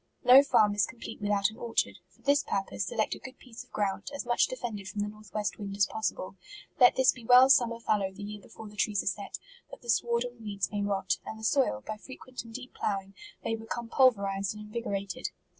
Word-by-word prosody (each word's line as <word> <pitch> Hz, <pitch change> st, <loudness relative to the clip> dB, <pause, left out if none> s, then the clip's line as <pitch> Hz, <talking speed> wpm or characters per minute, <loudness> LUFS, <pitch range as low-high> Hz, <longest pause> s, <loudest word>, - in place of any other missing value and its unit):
No 255 Hz, +2 st, +9 dB
farm 215 Hz, -7 st, +4 dB
is 205 Hz, 0 st, +2 dB
complete 225 Hz, -2 st, -9 dB
without 205 Hz, 0 st, +2 dB
an 220 Hz, -, -14 dB
orchard: 235 Hz, -1 st, -1 dB
for -, -, -28 dB
this 285 Hz, +1 st, +4 dB
purpose 195 Hz, 0 st, -2 dB
select 215 Hz, -, 0 dB
a -, -, -7 dB
good 265 Hz, 0 st, -11 dB
piece 240 Hz, -3 st, -11 dB
of -, -, -26 dB
ground, 200 Hz, -1 st, -2 dB
as 280 Hz, -, -4 dB
much 240 Hz, 0 st, +3 dB
defended 225 Hz, -6 st, -5 dB
from 205 Hz, -, -3 dB
the 205 Hz, -, -1 dB
north 215 Hz, 0 st, -12 dB
west 210 Hz, 0 st, -2 dB
wind 200 Hz, -1 st, -5 dB
as 200 Hz, -, +5 dB
possible. 200 Hz, -3 st, -3 dB, 0.4 s
Let 245 Hz, -2 st, +7 dB
this 260 Hz, 0 st, +5 dB
be 245 Hz, -, -12 dB
well 250 Hz, +3 st, +7 dB
summer 235 Hz, -4 st, +4 dB
fal 215 Hz, -2 st, +1 dB
lowed 190 Hz, -1 st, -3 dB
the 205 Hz, -, -8 dB
year 210 Hz, 0 st, -7 dB
before 220 Hz, -, -11 dB
the 210 Hz, -, -13 dB
trees 205 Hz, -1 st, +1 dB
are -, -, -13 dB
set, 200 Hz, +1 st, -3 dB, 0.3 s
that -, -, -12 dB
the 235 Hz, -, +1 dB
sward 235 Hz, 0 st, +1 dB
and 245 Hz, -1 st, -8 dB
weeds 200 Hz, -3 st, -3 dB
may 205 Hz, -1 st, -2 dB
rot, 195 Hz, -2 st, 0 dB
and 220 Hz, -, -7 dB
the 220 Hz, -, -11 dB
soil, 220 Hz, -, +2 dB
by 215 Hz, -, -4 dB
frequent 255 Hz, +1 st, -9 dB
and 230 Hz, -, -12 dB
deep 255 Hz, +2 st, -8 dB
ploughing, 195 Hz, -1 st, -3 dB, 0.3 s
may 225 Hz, -, -1 dB
become 230 Hz, +1 st, -6 dB
pulverized 200 Hz, -7 st, +2 dB
and 210 Hz, 0 st, -8 dB
invigorated. 210 Hz, +1 st, -3 dB
215 Hz, 230 wpm, -29 LUFS, 200-240 Hz, 0.4 s, No